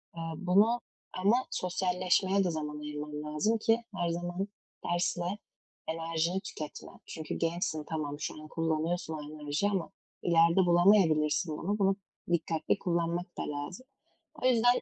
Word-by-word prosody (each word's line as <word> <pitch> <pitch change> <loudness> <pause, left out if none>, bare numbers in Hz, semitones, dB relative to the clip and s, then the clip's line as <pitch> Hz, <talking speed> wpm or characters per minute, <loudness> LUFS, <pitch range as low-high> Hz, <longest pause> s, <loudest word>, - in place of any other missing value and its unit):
Eee, 165 - -5 0.2
bunu 205 +6 +4 0.4
ama 215 +7 +3
sosyalleşmeye 185 +2 +1
de 180 - +1
zaman 150 -2 -4
ayırman 150 0 -5
lazım 155 +10 +1
ki 225 +1 +2
her 175 -2 0
zaman 175 +3 -2 0.4
dersle 175 +2 0 0.5
enerjini 165 +2 0
tüketme. 155 -7 -7
Çünkü 160 -1 -5
gençsin, 165 -2 -1
tamam 145 -2 -3
şu 155 - -4
an 155 - -10
kullanıyorsun 165 +1 -1
o 155 - -4
enerjiyi 150 +5 -2
ama 190 -4 -1 0.3
ileride 170 -1 +5
bulamayabilirsin 170 -3 +4
bunu. 205 +4 -1
Bunu 195 -1 +4 0.4
dikkatli 165 +2 +1
kullanmak 170 0 0
da - - -3
lazım. 145 - -6 0.6
O - - +1
yüzden 245 0 +4
170 Hz, 135 wpm, -31 LUFS, 155-190 Hz, 0.6 s, ileride